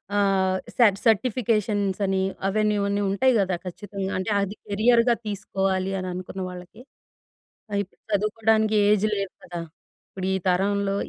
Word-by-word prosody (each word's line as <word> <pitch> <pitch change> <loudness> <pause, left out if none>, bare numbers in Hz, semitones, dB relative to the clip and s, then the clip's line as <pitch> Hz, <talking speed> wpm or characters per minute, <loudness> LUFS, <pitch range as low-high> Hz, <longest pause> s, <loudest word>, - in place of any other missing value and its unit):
ఆహ్, 190 -2 +2 0.2
స - - -27 0.3
సర్టిఫికేషన్స్ 215 -3 +1
అని 190 0 +1 0.3
అవన్నీ 210 +1 +1
ఇవన్నీ 200 0 0
ఉంటాయి 255 +7 +3
కదా 190 -2 +1
ఖచ్చితంగా. 195 +1 -5
అంటే 185 +3 -2
అది 200 +1 -3
కెరియర్‌గా 230 +3 +3
తీసుకోవాలి 195 -2 -1
అని 185 - -4
అనుకున్న 185 +1 -6
వాళ్ళకి. 180 +5 -11 0.9
ఆ - - -5
ఇప్పుడు 190 - -21
చదువుకోడానికి 215 +1 +2
ఏజ్ 210 0 +3
లేదు 195 -2 -3
కదా! 175 -1 -6 0.5
ఇప్పుడు 190 -1 -5
ఈ - - +2
తరంలో 195 +2 +1
200 Hz, 135 wpm, -25 LUFS, 190-215 Hz, 0.9 s, ఉంటాయి